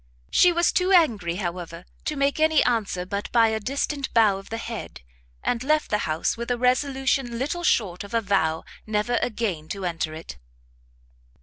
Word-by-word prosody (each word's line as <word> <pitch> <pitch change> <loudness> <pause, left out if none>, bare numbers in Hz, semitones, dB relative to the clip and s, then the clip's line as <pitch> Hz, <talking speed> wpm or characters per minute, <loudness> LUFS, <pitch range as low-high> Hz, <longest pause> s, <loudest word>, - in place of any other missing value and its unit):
She 360 - +6
was 345 0 +2
too 365 +1 +1
angry, 225 - +3
however, 175 -2 -5 0.2
to 305 - -1
make 280 +1 +1
any 315 0 +4
answer 200 -6 0
but 200 +2 -4
by 230 -1 +5
a 220 0 -1
distant 275 +4 -2
bow 210 -4 +4
of 195 - -14
the 225 - -3
head, 230 - -7 0.4
and 245 0 -1
left 305 +2 +1
the 210 - +2
house 155 +1 0
with 235 +1 -6
a 245 - +1
resolution 260 0 +1
little 300 +8 -2
short 195 - +1
of 200 +3 -6
a 230 - +3
vow 175 -6 +1 0.2
never 215 +3 0
again 205 -9 -2
to 195 +1 -5
enter 165 -2 -2
it. 160 - -9
225 Hz, 180 wpm, -24 LUFS, 190-270 Hz, 0.4 s, She